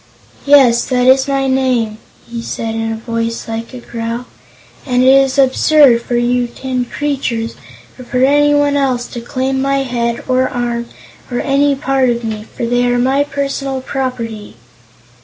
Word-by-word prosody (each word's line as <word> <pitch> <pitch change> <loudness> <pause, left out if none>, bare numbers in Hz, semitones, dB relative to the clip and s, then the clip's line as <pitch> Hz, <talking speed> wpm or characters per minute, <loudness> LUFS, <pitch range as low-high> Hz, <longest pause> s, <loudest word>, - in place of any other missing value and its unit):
"Yes, 265 -5 +6
that 250 -1 +1
is 265 +1 +4
my 275 -1 0
name," 255 -5 0 0.3
he 235 0 -6
said 225 -1 -4
in 225 0 -2
a - - -2
voice 230 0 -4
like 225 0 -5
a 255 - -8
growl, 235 +1 -5 0.6
"and 250 -2 +1
it 260 +1 +6
is 270 -1 +3
absurd 270 -1 +5
for 240 - -3
you 245 0 +1
tin 255 +1 -3
creatures, 250 -5 -3 0.5
or 255 - -9
for 250 +1 0
anyone 290 0 +3
else, 260 -4 0
to 240 - -7
claim 265 +2 -2
my 275 0 +1
head, 235 -2 -2
or 255 0 +2
arm, 240 -1 -3 0.4
or 245 -1 -2
any 280 +1 +2
part 270 -2 +1
of 235 0 -1
me, 215 -1 -4
for 235 - -1
they 245 +1 +1
are 245 0 +1
my 265 +3 +2
personal 275 -1 -3
property." 250 - -5
255 Hz, 165 wpm, -15 LUFS, 235-270 Hz, 0.6 s, Yes